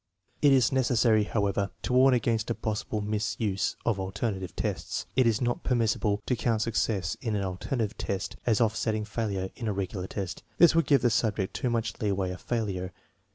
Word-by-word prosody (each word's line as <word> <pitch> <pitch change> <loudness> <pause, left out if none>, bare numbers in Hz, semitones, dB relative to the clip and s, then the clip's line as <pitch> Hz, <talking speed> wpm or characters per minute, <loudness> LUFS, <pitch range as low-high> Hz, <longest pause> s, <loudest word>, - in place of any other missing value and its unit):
It 145 - +6
is 130 -3 +4
necessary, 120 -5 +3
however, 100 -2 0
to - - -1
warn 130 +1 +6
against 115 -2 0
a 115 - 0
possible 110 0 -3
misuse 105 -1 -1
of 110 -4 +1
alternative 95 -1 -3
tests. - - -3
It 130 -2 +4
is 110 0 +1
not 120 -1 -1
permissible 110 -4 +1
to 125 - +1
count 115 -2 0
success 110 -4 0
in 115 -4 -1
an 100 - 0
alternative 105 +4 -2
test 100 0 -3
as 115 -4 +2
offsetting 110 -1 +1
failure 100 -4 -3
in 115 - -5
a 105 - 0
regular 95 -1 -3
test. 95 -4 -5 0.2
This 170 - +7
would 165 0 +2
give 140 -4 +4
the 120 - +4
subject 105 -4 0
too 125 - -1
much 115 -1 -1
leeway 100 -3 0
of 90 - -8
failure. 100 -6 -2
110 Hz, 185 wpm, -28 LUFS, 100-120 Hz, 0.2 s, This